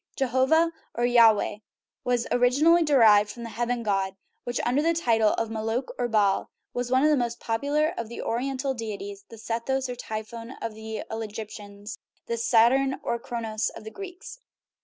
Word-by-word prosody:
Jehovah, 270 +6 +3 0.2
or 240 - -1
Yahveh, 225 -3 +4 0.4
was 245 -1 +1
originally 280 +8 +4
derived 225 -9 +5
from 235 +3 -8
the 230 - -6
heaven 240 +2 -2
god, 195 -2 0 0.3
which, 245 0 -2
under 255 +4 +2
the 330 +2 +2
title 225 -9 +3
of 225 -1 -2
Moloch 225 +3 -2
or 245 - +1
Baal, 210 -4 +2 0.2
was 245 0 -2
one 260 +2 +3
of 305 - +5
the - - +5
most 240 -3 -2
popular 290 +8 0
of 230 -1 -5
the 235 - -8
Oriental 265 +3 -1
deities 205 -4 -6
(the 230 - -11
Sethos 235 +4 -2
or 250 - -3
Typhon 230 +1 -6
of 230 -1 -4
the 220 0 -6
Egyptians, 210 -2 -7 0.3
and - - -2
the - - -1
Saturn 255 +4 +3
or 235 - -1
Cronos 225 -2 -3
of - - -9
the 220 - -8
Greeks). 395 - -9
235 Hz, 175 wpm, -26 LUFS, 220-265 Hz, 0.4 s, derived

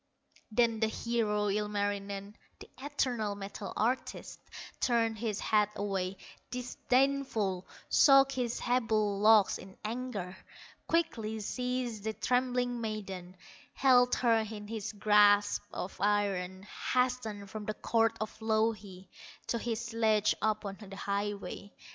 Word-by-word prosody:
Then 230 0 +2
the 220 - +2
hero, 215 -2 0
Ilmarinen, 205 -1 -2 0.2
The - - -12
eternal 250 -7 -1
metal 200 0 -7
artist, 245 +4 -2 0.4
Turned 225 -3 +1
his 215 -3 -2
head 210 -1 +2
away, 195 -2 -2 0.3
disdainful, 250 -6 0 0.2
Shook 275 -1 +6
his 245 -3 -2
sable 220 -5 +1
locks 215 -1 +5
in 190 0 -12
anger, 215 -6 -4 0.5
Quickly 225 -10 0
seized 250 -1 -3
the 220 0 -2
trembling 245 0 0
maiden, 195 -5 -5 0.4
Held 250 -2 +5
her 235 -2 +3
in 215 -1 -5
his 215 -1 -4
grasp 205 -1 +4
of 185 - -5
iron, 195 -2 0 0.3
Hastened 235 -6 0
from 215 -1 -6
the 215 - -3
court 225 0 +1
of 215 - -4
Louhi, 215 -4 -1 0.4
To 235 - 0
his 230 -1 -2
sledge 220 -2 +2
upon 215 -2 -1
the 195 -2 -10
highway. 200 0 -4
215 Hz, 120 wpm, -31 LUFS, 205-235 Hz, 0.5 s, Shook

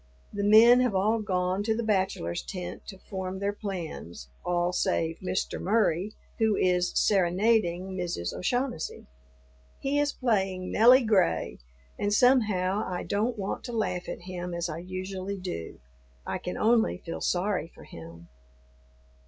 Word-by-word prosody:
The 200 0 -2
men 225 +4 +7
have 250 -5 +1
all 215 +4 +2
gone 185 -2 -1
to 220 +1 0
the 235 - -1
bachelors' 190 - 0
tent 180 -2 -7
to 195 - -8
form 190 -1 -5
their 200 +1 -1
plans, 165 - -6
all 175 0 0
save 165 -2 0
Mr. 185 0 -2
Murry, 205 -1 +1 0.3
who 220 -2 +3
is 180 -1 +2
"serenading" 190 -1 +2
Mrs. 175 - -3
O'Shaughnessy. 245 -2 -2 0.7
He 280 +1 0
is 290 0 +1
playing 195 -8 -1
"Nelly 250 +4 +6
Gray," 85 - +1 0.4
and 205 - 0
somehow 210 -5 +3
I 180 -1 -4
don't 220 +4 -1
want 195 -1 -4
to 240 - -6
laugh 180 -5 -2
at - - -6
him 180 -1 -5
as 170 0 -2
I 165 - -5
usually 185 +2 -5
do; 180 - -6 0.5
I - - -3
can 180 - -5
only 225 -1 +3
feel 170 -2 -7
sorry 180 -3 0
for - - -16
him. 85 +1 -12
190 Hz, 145 wpm, -28 LUFS, 180-215 Hz, 0.7 s, men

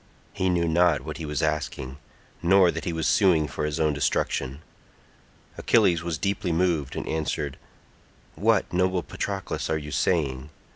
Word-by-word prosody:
He 95 - 0
knew 85 -1 +1
not 85 -1 +3
what - - -6
he 80 -2 -6
was 75 +1 -2
asking, 75 -3 -2 0.4
nor 90 0 +5
that 80 -2 -6
he 85 - -1
was 80 -1 -2
suing 90 -7 +3
for 75 - -3
his 75 -1 -2
own 75 -2 +2
destruction. 70 0 -1 1.0
Achilles 85 -2 +3
was 85 -2 -3
deeply 100 0 -1
moved 85 -5 0
and - - -4
answered, 75 -2 -2 0.8
"What, - - +1
noble 90 0 +1
Patroclus, 100 -2 -4
are 80 - +1
you 75 -1 -7
saying? 70 -1 0
80 Hz, 155 wpm, -25 LUFS, 75-90 Hz, 1.0 s, nor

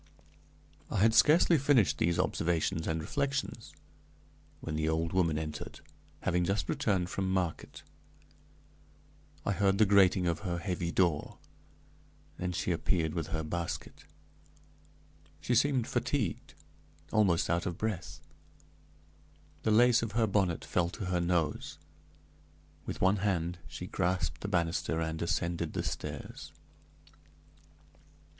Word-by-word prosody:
I - - -2
had 110 +1 +5
scarcely 160 +4 +5
finished 130 - +3
these 85 0 +2
observations 80 -1 0
and 80 0 0
reflections, 140 - -2 0.9
when 80 - -5
the 80 0 0
old 80 +1 -1
woman 85 -5 +2
entered, 75 -1 -6 0.4
having 90 0 +1
just 100 +4 0
returned 100 - 0
from 95 0 -1
market. 90 -4 -2 1.6
I - - +1
heard 100 0 +2
the 110 - +5
grating 95 -2 +4
of 85 -2 0
her 90 -4 -3
heavy 85 -1 -2
door. 85 -5 0 1.0
Then 90 0 -2
she 90 +1 -1
appeared 80 -1 0
with 85 -4 -3
her 80 -1 -2
basket. 85 +2 -5 1.3
She 125 - -1
seemed 130 0 +3
fatigued 120 - -2 0.6
almost 100 -6 +3
out 85 +1 0
of 90 -1 -4
breath. 85 -8 -4 1.4
The - - 0
lace 120 +2 +5
of 115 -3 -4
her 115 0 +3
bonnet 95 -5 0
fell 85 -1 0
to 95 - -6
her 90 -1 0
nose. 85 -4 -1 1.1
With - - -5
one 95 +2 +4
hand 90 -3 -1
she - - -7
grasped 90 -1 -1
the - - -3
banister 85 -3 0
and 80 0 -3
ascended 85 0 -1
the - - -2
stairs. - - -6
90 Hz, 125 wpm, -31 LUFS, 85-105 Hz, 1.6 s, had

